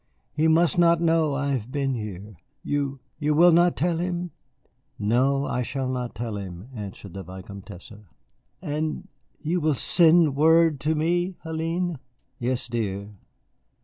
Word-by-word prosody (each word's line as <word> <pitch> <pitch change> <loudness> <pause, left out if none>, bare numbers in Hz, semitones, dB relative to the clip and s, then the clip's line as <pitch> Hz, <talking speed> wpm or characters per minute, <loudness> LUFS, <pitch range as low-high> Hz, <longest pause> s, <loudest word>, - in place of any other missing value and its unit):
He 155 +3 +2
must 170 +2 +3
not 170 -1 +5
know 165 -3 +2
I 140 0 -1
have 125 -2 -3
been 140 -1 -1
here. 105 -3 -6 0.3
You 140 -2 -2 0.2
you 150 -1 +1
will 175 +3 +7
not 175 +1 +4
tell 170 +1 +1
him?" 175 0 -2 0.7
"No, 130 +6 +2
I 125 - -1
shall 130 +2 -3
not 125 -2 -3
tell 110 -1 -4
him," 95 +2 -8
answered 100 -4 -8
the 95 - -6
Vicomtesse. 95 +1 -10 0.7
"And 155 -1 -3 0.3
you 165 +4 -1
will 155 -1 +2
send 165 -1 +4
word 160 0 +4
to 155 +3 0
me, 175 +4 0
Hélène?" 165 +1 -2 0.4
"Yes, 125 0 -2
dear." 105 -4 -3
145 Hz, 145 wpm, -25 LUFS, 115-165 Hz, 0.7 s, will